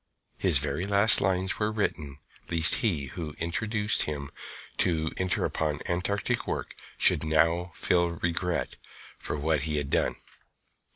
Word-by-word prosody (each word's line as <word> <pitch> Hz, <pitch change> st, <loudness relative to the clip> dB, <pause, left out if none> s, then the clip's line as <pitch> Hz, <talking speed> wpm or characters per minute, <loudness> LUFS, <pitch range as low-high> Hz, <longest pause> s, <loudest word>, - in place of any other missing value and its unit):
His -, -, +4 dB
very 90 Hz, -, -1 dB
last 100 Hz, +2 st, +6 dB
lines 95 Hz, -1 st, 0 dB
were 105 Hz, 0 st, +1 dB
written 75 Hz, -10 st, -2 dB, 0.3 s
lest 85 Hz, 0 st, +3 dB
he 85 Hz, -, 0 dB
who 80 Hz, -4 st, -6 dB
induced 105 Hz, +5 st, 0 dB
him 70 Hz, -2 st, -3 dB, 0.5 s
to 80 Hz, -3 st, +1 dB
enter 95 Hz, -1 st, 0 dB
upon 75 Hz, -2 st, -1 dB
Antarctic 90 Hz, +4 st, -1 dB
work -, -, -4 dB, 0.2 s
should -, -, +3 dB
now 80 Hz, +3 st, +2 dB
feel 85 Hz, -1 st, +2 dB
regret 85 Hz, +1 st, -2 dB, 0.4 s
for -, -, -4 dB
what 75 Hz, 0 st, 0 dB
he 75 Hz, -, 0 dB
had 70 Hz, -1 st, -3 dB
done. -, -, +1 dB
85 Hz, 135 wpm, -28 LUFS, 80-95 Hz, 0.5 s, last